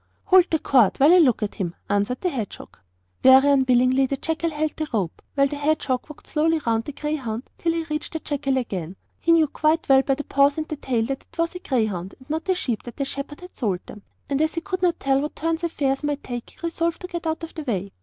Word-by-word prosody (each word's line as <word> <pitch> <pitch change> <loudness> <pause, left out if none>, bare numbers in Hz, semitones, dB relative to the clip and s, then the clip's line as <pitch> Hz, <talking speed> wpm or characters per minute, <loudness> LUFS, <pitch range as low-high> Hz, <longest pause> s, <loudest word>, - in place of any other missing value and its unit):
'Hold 375 -2 +6
the 320 - +2
cord 250 -9 +3
while 290 +5 +7
I 365 - +7
look 255 -9 +4
at 205 - -2
him,' 175 -3 -4
answered 205 +5 0
the 365 - +1
hedgehog. 225 -8 -6 0.5
Very 265 +1 +7
unwillingly 260 0 +4
the 275 - -2
jackal 325 +3 -1
held 310 0 -2
the 310 - -3
rope, 195 -8 -2
while 275 -1 +4
the 285 +1 -3
hedgehog 290 -3 0
walked 300 - -12
slowly 325 +1 +1
round 225 -1 +1
the - - -5
greyhound 270 -6 -4
till 335 -1 +1
he 330 0 -1
reached 305 -1 -4
the 320 - -2
jackal 280 -3 -1
again. 190 -8 -3 0.2
He 335 - +2
knew 330 -1 +6
quite 310 +3 +1
well 270 -1 +6
by 270 0 +1
the 290 - -5
paws 280 +1 +3
and 310 0 -2
tail 255 -6 -1
that 270 +2 -5
it - - -21
was 335 0 0
a 360 - -6
greyhound 215 - -2
and 260 - -19
not 320 +5 -3
a 375 - +4
sheep, 240 - -2
that 240 - -10
the 275 - -1
shepherd 280 +3 -6
had 360 +1 -12
sold 195 -7 -1
them; 210 - -11 0.3
and 280 +1 0
as 315 +1 +1
he 330 - -1
could 370 +1 -4
not 350 -2 +2
tell 270 0 +2
what 300 - -4
turn 325 +1 -1
affairs 285 -5 -1
might 290 -1 -2
take, 240 -2 -6
he - - -22
resolved 335 0 -1
to 360 - -5
get 345 -2 -5
out 320 +1 -2
of 330 - -7
the 315 - -5
way. 200 -8 -3
280 Hz, 250 wpm, -23 LUFS, 250-320 Hz, 0.5 s, while